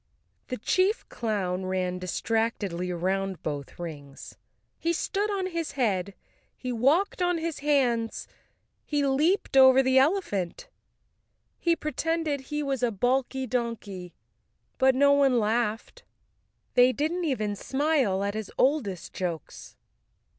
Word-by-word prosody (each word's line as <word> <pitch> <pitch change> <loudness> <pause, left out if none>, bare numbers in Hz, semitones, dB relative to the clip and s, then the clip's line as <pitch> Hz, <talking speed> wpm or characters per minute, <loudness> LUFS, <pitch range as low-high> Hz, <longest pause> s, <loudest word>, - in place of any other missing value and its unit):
The 255 - -4
chief 375 - +1
clown 190 -5 -2
ran 185 -1 -1
distractedly 185 -1 -1
around 190 +2 -2
both 145 -3 -5
rings. 145 -5 -8 0.5
He 335 +1 0
stood 405 +5 -1
on 395 -2 -1
his 335 -3 -3
head, 200 -7 0 0.4
he 255 - -4
walked 290 - +2
on 355 -1 +2
his 330 -1 -3
hands, 250 -6 +1 0.6
he 290 -2 0
leaped 300 +6 +1
over 265 0 +7
the 260 0 +4
elephant, 265 - 0 0.9
he 340 -1 +2
pretended 320 -2 -2
he 295 +2 -3
was 270 -3 -2
a 245 - +2
balky 255 +5 0
donkey. 220 -7 -4 0.6
But 265 0 +4
no 280 +2 +5
one 275 -3 +4
laughed. 225 - -1 0.7
They 250 0 +6
didn't 320 +6 -1
even 215 -8 -1
smile 265 -6 +1
at 200 0 -1
his 215 -1 -5
oldest 255 - 0
jokes. 170 -4 -5
250 Hz, 125 wpm, -27 LUFS, 195-295 Hz, 0.9 s, over